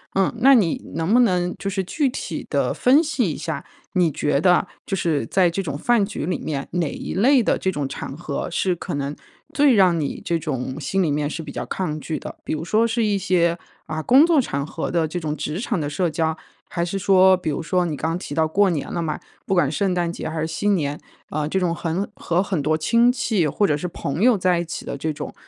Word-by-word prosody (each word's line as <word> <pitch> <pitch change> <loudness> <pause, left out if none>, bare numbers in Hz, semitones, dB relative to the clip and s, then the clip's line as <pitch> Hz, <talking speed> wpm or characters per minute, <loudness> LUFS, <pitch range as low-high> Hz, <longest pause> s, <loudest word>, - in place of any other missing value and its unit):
嗯。 195 -1 +2
那 270 +3 +7
你 195 -9 +2
能 165 +5 0
不 245 - +6
能 180 -5 +1
就 195 - -3
是 190 0 -1
具 270 - 0
体 - - -5
地 - - +1
分 265 +5 +4
析 310 - 0
一 - - -5
下， - - -4 0.3
你 175 -4 +3
觉 145 0 0
得 180 +1 +4 0.2
就 195 - -2
是 155 -9 0
在 180 +6 +3
这 195 +3 -2
种 145 -5 -4
饭 235 +3 +2
局 200 -6 -5
里 180 - -1
面， 140 -3 -4
哪 170 -4 0
一 - - -6
类 255 +6 +5
的 - - +1
这 190 - -1
种 145 -4 -2
场 135 - -6
合， 155 -4 -4
是 180 +1 +1
可 170 - -6
能 140 +1 -3 0.4
最 285 -3 +5
让 185 -6 +4
你 145 - -3
这 170 - 0
种 135 -3 -4
心 155 +7 0
里 165 - +1
面 145 0 0
是 165 - -5
比 145 - -8
较 - - -4
抗 160 -5 -3
拒 155 +1 -4
的。 - - -8
比 - - -3
如 155 0 -3
说 215 +7 +2
是 230 0 0
一 205 -1 +1
些， 175 -3 +1 0.3
啊， 155 0 -3
工 265 - +6
作 335 -3 +4
场 140 - -3
合 - - -4
的 165 -2 +1
这 160 - -5
种 155 -2 -3
职 155 +1 -4
场 230 -4 -1
的 145 -2 -2
社 170 +3 0
交， 160 0 -1 0.3
还 170 - -2
是 195 +3 -3
说， 190 -1 +5
比 170 -3 -3
如 150 +3 -2
说 180 +1 +1
你 160 -3 -2
刚 160 +3 -2
提 145 - -6
到 160 - +3
过 195 +5 +3
年 155 -6 -3
了 170 - -2
嘛， 155 -2 -2 0.3
不 195 - 0
管 150 -6 +3
圣 190 +2 0
诞 175 -1 0
节 - - -5
还 160 0 -4
是 - - 0
新 200 +5 +1
年， 145 -4 -2 0.3
啊， 150 0 -2
这 175 - -1
种 175 -2 0
很 170 +3 -2
和 175 +3 0
很 185 -6 -1
多 155 +2 +1
亲 235 +9 +3
戚 225 -9 0
或 205 +7 +1
者 150 - +2
是 180 - -3
朋 160 0 -4
友 240 -2 +5
在 180 -2 +2
一 170 - -2
起 165 - -6
的 - - -4
这 155 +3 -2
种， - - -7
175 Hz, 270 characters per minute, -22 LUFS, 155-195 Hz, 0.4 s, 那